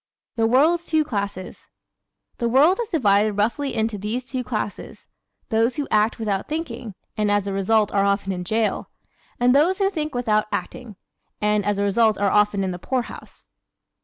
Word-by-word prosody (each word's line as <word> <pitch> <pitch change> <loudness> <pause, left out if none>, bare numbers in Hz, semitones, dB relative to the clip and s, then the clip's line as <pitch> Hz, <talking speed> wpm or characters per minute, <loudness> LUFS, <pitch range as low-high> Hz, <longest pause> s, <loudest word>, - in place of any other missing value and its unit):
The 225 -1 +2
World's 320 +8 +3
Two 315 -1 +2
Classes 200 -8 -5 0.7
¶ - - -41
The 235 - 0
world 300 - +4
is 455 - -5
divided 210 - +2
roughly 235 +6 -1
into 220 -2 -1
these 225 +5 -3
two 250 +1 -4
classes: 215 -4 -5 0.4
those 225 +1 +1
who 290 -2 -3
act 215 +2 +2
without 205 -4 -2
thinking 250 - -5 0.2
(and 210 -1 0
as 205 -1 +1
a 200 - -3
result 205 +2 +2
are 200 -1 +2
often 200 0 0
in 180 -1 -4
jail); 220 +4 -1 0.5
and 245 +1 +4
those 325 +7 +3
who 390 -1 +1
think 305 -6 -4
without 215 -4 +1
acting 235 -5 -5 0.4
(and 210 -1 +1
as 205 0 0
a 200 - 0
result 215 +1 +2
are 200 -1 +1
often 210 -1 +2
in 190 - -1
the 180 - -6
poorhouse). 255 +5 -5
220 Hz, 180 wpm, -22 LUFS, 205-255 Hz, 0.7 s, world